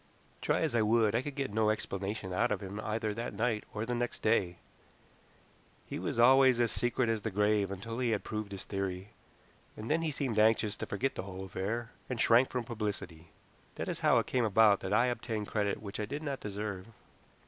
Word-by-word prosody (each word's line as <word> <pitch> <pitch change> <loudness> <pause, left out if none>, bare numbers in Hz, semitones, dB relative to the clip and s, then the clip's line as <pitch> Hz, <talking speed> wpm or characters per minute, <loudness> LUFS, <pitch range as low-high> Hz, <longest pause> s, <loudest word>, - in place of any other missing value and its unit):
Try - - +1
as - - 0
I 115 - +3
would, 110 0 +3
I 115 - +2
could 145 +1 -6
get 135 -6 -3
no 110 0 +3
explanation 100 -2 -3
out 120 +6 +1
of 105 - 0
him 100 +1 -6
either 110 0 -2
that 115 -1 -5
night 110 0 0
or 105 +1 -3
next 120 0 -3
day. 95 -5 +2 1.3
He - - -5
was - - -3
always 130 +1 +6
as 120 -2 +2
secret 120 0 +1
as 115 -1 0
the 110 - -2
grave 105 0 +2
until 115 +5 -5
he 125 -2 +1
had 110 -3 0
proved 105 -2 -4
his 100 -2 -5
theory, 95 0 -4 0.7
and 110 +5 -4
then 160 +2 +2
he 165 - 0
seemed 135 -7 -1
anxious 110 -1 +3
to - - -5
forget 130 +7 -1
the - - -4
whole 95 0 -7
affair, 105 +6 -3 0.2
and 125 -3 -3
shrank 120 +3 +5
from 125 -1 -2
publicity. 100 -8 -5 0.5
That - - -4
is - - -3
how - - +4
it - - +2
came 125 -2 0
about 105 -1 +5
that 95 - -5
I 110 +4 +4
obtained 115 -3 -3
credit 105 -1 -1
which 100 0 -6
I 105 - -1
did 145 +6 -5
not 140 -3 -3
deserve. 100 -2 -5
110 Hz, 210 wpm, -32 LUFS, 100-120 Hz, 1.3 s, always